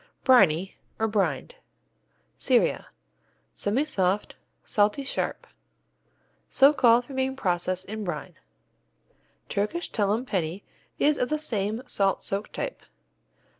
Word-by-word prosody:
Briney, 190 - +4 0.2
or 220 - +1
Brined 190 -11 -1 0.8
Syria - - +1 0.7
Semisoft, 205 -5 0 0.3
salty, 210 +6 +1
sharp. 270 - -3 1.0
So 280 +2 +6
called 245 -3 +4
from 265 +1 -9
being 265 0 0
processed 185 -4 -1
in 215 +2 -5
brine. 165 -6 -5 1.1
Turkish 215 +13 -2
Tullum 210 +3 0
Penney 185 -3 -2 0.3
is 295 0 +2
of 250 - 0
the 305 - +1
same 220 -5 -2
salt 195 -5 0
soaked 200 +2 -2
type. - - -4
210 Hz, 105 wpm, -26 LUFS, 190-260 Hz, 1.1 s, So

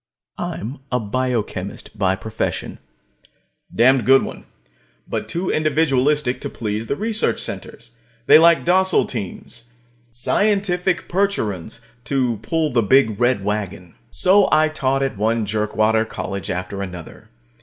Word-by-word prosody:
I'm 120 +8 -5
a 125 - +1
biochemist 110 -4 -3
by 95 -3 +1
profession. 110 +2 -4 0.9
A - - -16
damned 130 +1 +5
good 135 +1 +5
one, - - -8 0.6
but - - -4
too 180 +2 -1
individualistic 150 -3 +1
to - - -3
please 110 0 -4
the 140 - -1
big - - -12
research 220 0 0
centers. 120 +1 -6 0.3
They - - +8
like 170 0 +5
docile 185 +2 +3
teams 115 +1 -7 0.4
scientific 180 - 0
Percherons 115 - -2 0.2
to 125 -5 0
pull 155 +8 -1
the 120 -1 +2
big 110 -1 +3
red 120 -4 +2
wagon. 100 -4 -4 0.2
So 185 - +4
I 155 0 +4
taught 135 -3 0
at 135 -6 -2
one 110 +1 0
jerkwater 110 +1 +1
college 100 -3 -5
after 90 +2 -4
another. 90 -4 -9
125 Hz, 135 wpm, -20 LUFS, 105-155 Hz, 0.9 s, They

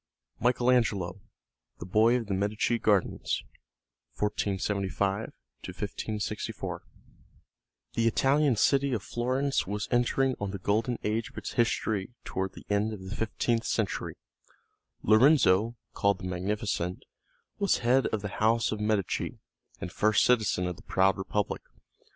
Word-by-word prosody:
II - - -6
Michael 125 0 +3
Angelo 100 -7 +1 0.6
The - - -7
Boy 110 +6 +4
of 120 -2 -1
the 100 - -2
Medici 105 +4 0
Gardens: 105 -4 +1 0.7
1475 100 -1 0 0.5
1564 105 -1 -4 1.1
The 115 0 +2
Italian 135 +3 +3
city 140 +4 +3
of 110 -4 -2
Florence 130 +3 0
was 105 +1 -3
entering 130 +2 +2
on 100 - -2
the 100 - -4
Golden 110 +5 0
Age 110 +2 -1
of - - -20
its - - -5
history 110 -2 0
toward 95 0 -3
the - - -12
end 105 +2 +1
of 95 -3 -8
the - - -3
fifteenth 115 +1 -1
century. 110 -4 -1 0.9
Lorenzo, 115 -2 +5 0.2
called 100 -1 +2
the - - -13
Magnificent, 90 0 -2 0.6
was 200 -2 +3
head 130 +2 +4
of 110 -2 -2
the 105 - -2
house 115 +1 +3
of 110 - -3
Medici, 105 -2 -1 0.4
and 90 - -5
first 110 +2 +3
citizen 110 -7 +2
of 90 -1 -3
the - - -13
proud 95 0 +2
Republic. 100 +2 -2
110 Hz, 135 wpm, -29 LUFS, 100-120 Hz, 1.1 s, Lorenzo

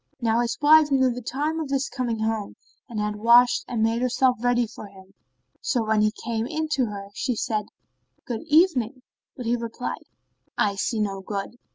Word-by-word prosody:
Now 230 -2 +1
his 240 -1 -1
wife 305 +1 +6
knew 260 -2 +3
the 245 +1 -5
time 295 +7 -2
of 310 -3 -4
his 275 0 0
coming 240 -3 -2
home 220 -1 -2 0.3
and 225 -3 -4
had 210 0 -2
washed 235 +3 +5
and 230 -3 -1
made 225 +1 +1
herself 255 0 +2
ready 245 0 +2
for 215 -1 -10
him, 195 -1 -17 0.5
so 240 - 0
when 215 -1 +2
he 215 0 +3
came 230 0 -1
in 315 +3 -3
to 265 -5 +1
her, 200 -1 -7
she 250 +3 -2
said, 215 -1 -2 0.6
"Good 235 -3 -4
evening," 285 - +3 0.3
but 250 - -6
he 235 +1 +2
replied 235 +1 -5 0.5
"I 205 - +2
see 215 +3 -2
no 195 -2 -2
good." 200 +3 -5
235 Hz, 190 wpm, -24 LUFS, 215-255 Hz, 0.6 s, wife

